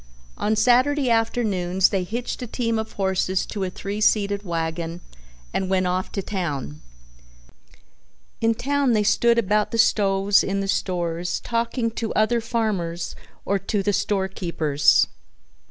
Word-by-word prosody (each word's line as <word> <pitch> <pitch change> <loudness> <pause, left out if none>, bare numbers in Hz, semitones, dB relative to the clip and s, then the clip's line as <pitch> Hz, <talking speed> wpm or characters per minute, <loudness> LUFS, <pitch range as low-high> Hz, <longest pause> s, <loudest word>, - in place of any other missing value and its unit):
On 215 +1 0
Saturday 255 +4 +3
afternoons 200 -6 +1
they 190 -2 0
hitched 235 +7 -4
a 245 - -4
team 230 -1 -1
of 220 0 -5
horses 190 -1 0
to 205 -3 -4
a 185 - -1
three 200 +3 -5
seated 205 -2 +2
wagon 165 -1 -3 0.5
and 190 -1 -1
went 185 -1 +2
off 180 +1 -1
to 195 - -2
town. 145 - -4 1.6
In 225 0 +2
town 280 0 +1
they 210 -1 +2
stood 235 +3 +3
about 210 -1 +2
the 230 - -3
stoves 200 -3 +3
in 195 0 -1
the 195 - -2
stores 175 -3 -1
talking 230 0 -1
to 225 0 -4
other 230 +2 +2
farmers 200 -8 -2 0.3
or 200 0 +1
to 195 +1 -2
the 205 +1 +1
store 195 0 0
keepers. 155 -7 +2
200 Hz, 145 wpm, -23 LUFS, 180-225 Hz, 1.6 s, Saturday